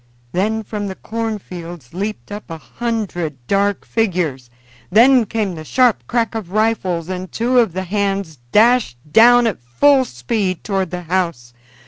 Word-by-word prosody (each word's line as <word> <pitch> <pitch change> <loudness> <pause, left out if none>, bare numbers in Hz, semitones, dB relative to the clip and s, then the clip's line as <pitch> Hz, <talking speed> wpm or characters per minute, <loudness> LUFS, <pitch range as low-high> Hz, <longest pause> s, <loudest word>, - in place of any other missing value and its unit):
Then 215 +6 0
from 210 -1 -4
the 190 - -5
cornfields 180 - -6
leaped 205 +3 -4
up 205 -1 -7
a 165 - -5
hundred 200 - -3
dark 200 +2 0
figures; 170 - -1 0.4
then 240 +3 +6
came 210 -4 -1
the 160 -2 -7
sharp 250 - +2
crack 235 -2 0
of 220 -6 -5
rifles, 195 -6 0
and 185 0 -5
two 245 +2 +2
of 225 -8 +2
the 190 +1 -3
hands 195 - -2
dashed 230 - +4
down 240 +5 +7
at 215 - -1
full 265 - +3
speed 185 - -2
toward 195 -3 -1
the 180 +1 -5
house. 170 -9 -2
200 Hz, 150 wpm, -19 LUFS, 175-225 Hz, 0.4 s, down